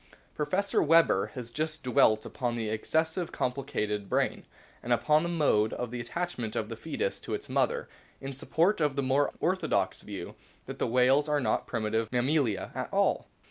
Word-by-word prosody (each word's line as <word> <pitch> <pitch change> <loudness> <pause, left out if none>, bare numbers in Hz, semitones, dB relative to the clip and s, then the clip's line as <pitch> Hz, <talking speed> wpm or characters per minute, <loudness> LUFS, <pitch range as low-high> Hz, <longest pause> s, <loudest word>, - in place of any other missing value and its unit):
Professor 190 +6 0
Weber 165 +2 +4
has 120 -2 -6
justly 155 -1 -3
dwelt 110 -1 +4
upon 120 -3 -2
the 110 -2 -2
ex 110 0 -4
cessively 160 +2 0
complicated 125 -6 -2
brain, - - 0 0.3
and - - -5
upon 150 0 +4
the 170 - -2
mode 145 -11 +2
of 125 -2 -4
the 125 - -4
attachment 120 -3 -4
of 105 - -2
the 115 - -5
fcetus 440 - -3
to - - -3
its 415 - -7
mother, 485 0 0 0.3
in 135 0 -6
support 165 +8 +1
of 145 -3 +1
the 140 - 0
more 135 +2 +2
orthodox 160 - 0
view 100 -4 -7 0.3
that - - -8
the - - +1
whales 130 +5 +3
are 150 -1 +2
not 130 - 0
primitive 110 -1 -1
Mammalia 125 -3 +1
at - - -4
all. - - +1
135 Hz, 180 wpm, -29 LUFS, 115-160 Hz, 0.3 s, Weber